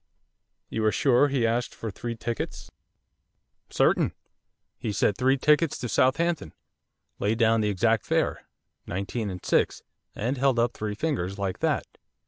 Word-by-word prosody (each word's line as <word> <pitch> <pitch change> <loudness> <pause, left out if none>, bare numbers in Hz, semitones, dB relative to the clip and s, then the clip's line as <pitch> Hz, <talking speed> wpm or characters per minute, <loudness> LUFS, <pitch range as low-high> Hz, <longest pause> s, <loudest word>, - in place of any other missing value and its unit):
'You 110 - -3
are 110 - +4
sure 135 +4 +4
he 135 -4 +1
asked 115 +2 -1
for 110 - -5
three 115 +4 -5
tickets?' 115 +1 -5 1.0
'Certain. - - +2 0.7
He 110 - -2
said 100 0 +1
three 130 +3 +2
tickets 150 +3 +3
to 120 - -4
Southampton; 140 - +1 0.6
laid 105 +2 +1
down 115 -1 +3
the 105 - +1
exact 110 +2 +1
fare, - - +1 0.5
nineteen 100 +4 -3
and 90 -2 -7
six - - +1 0.3
and 125 +5 -2
held 135 -2 +3
up 120 0 +2
three 105 -1 -4
fingers 100 - -2
like 95 -2 -3
that. - - 0
115 Hz, 145 wpm, -26 LUFS, 105-130 Hz, 1.0 s, are